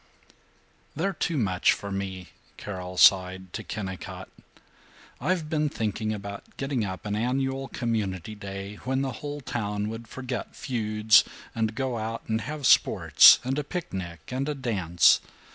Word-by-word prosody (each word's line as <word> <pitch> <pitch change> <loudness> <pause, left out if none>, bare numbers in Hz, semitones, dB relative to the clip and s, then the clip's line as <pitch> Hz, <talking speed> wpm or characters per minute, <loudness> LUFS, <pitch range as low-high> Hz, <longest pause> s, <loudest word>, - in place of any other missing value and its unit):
VIII - - -31 0.7
"They're 195 0 +1
too 165 -1 -1
much 95 -7 +3
for 100 - -6
me," 95 -2 -4 0.3
Carol 90 -2 -6
sighed 95 -1 +4
to 110 - -4
Kennicott. 95 -4 -6 0.9
"I've 180 -4 0
been 150 -1 0
thinking 110 -2 -2
about 100 -1 -7
getting 135 -4 -1
up 95 +2 -5
an 105 0 -1
annual 135 +4 -1
Community 110 -7 -2
Day, 100 0 -7
when 130 +4 -1
the 135 - -2
whole 145 0 -5
town 105 -4 -3
would 115 +1 -7
forget 125 -3 -5
feuds 110 -4 +3 0.3
and 110 -1 -1
go 130 -3 -2
out 115 +1 -4
and 110 0 0
have 150 -2 -5
sports - - +7
and 135 +3 -1
a - - -2
picnic 95 - -6
and 135 +3 -2
a 150 - -2
dance. 95 -10 +3
110 Hz, 150 wpm, -27 LUFS, 100-130 Hz, 0.9 s, sports